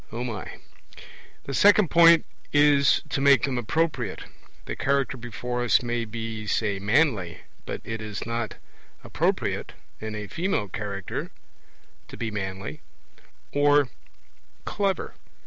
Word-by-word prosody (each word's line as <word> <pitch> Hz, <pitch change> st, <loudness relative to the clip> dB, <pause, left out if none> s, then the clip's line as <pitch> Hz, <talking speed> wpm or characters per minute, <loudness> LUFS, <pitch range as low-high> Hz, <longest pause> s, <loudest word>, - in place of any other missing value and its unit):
The 120 Hz, +3 st, -9 dB
second 205 Hz, +1 st, +5 dB
point 170 Hz, -1 st, +7 dB, 0.3 s
is 145 Hz, -1 st, +4 dB
to 135 Hz, -, -1 dB
make 140 Hz, -4 st, +5 dB
them 130 Hz, -2 st, 0 dB
appropriate. 125 Hz, -, -1 dB, 0.4 s
The -, -, -4 dB
Character 140 Hz, -1 st, 0 dB
before 120 Hz, 0 st, -4 dB
us 120 Hz, 0 st, +3 dB
may 120 Hz, -1 st, -1 dB
be, 110 Hz, -1 st, -5 dB
say, 100 Hz, -2 st, 0 dB
manly; 105 Hz, -, +1 dB, 0.3 s
but -, -, -4 dB
it 110 Hz, 0 st, -5 dB
is 105 Hz, -1 st, -5 dB
not 115 Hz, -1 st, -3 dB, 0.5 s
appropriate -, -, -1 dB, 0.3 s
in 110 Hz, 0 st, -5 dB
a 105 Hz, 0 st, -5 dB
female 135 Hz, -, -2 dB
Character 100 Hz, 0 st, -4 dB, 0.8 s
to -, -, -10 dB
be 115 Hz, -2 st, -3 dB
manly, 95 Hz, -7 st, -5 dB, 0.7 s
or 145 Hz, -1 st, +4 dB, 0.8 s
clever. 200 Hz, -2 st, -1 dB
120 Hz, 115 wpm, -26 LUFS, 105-140 Hz, 0.8 s, point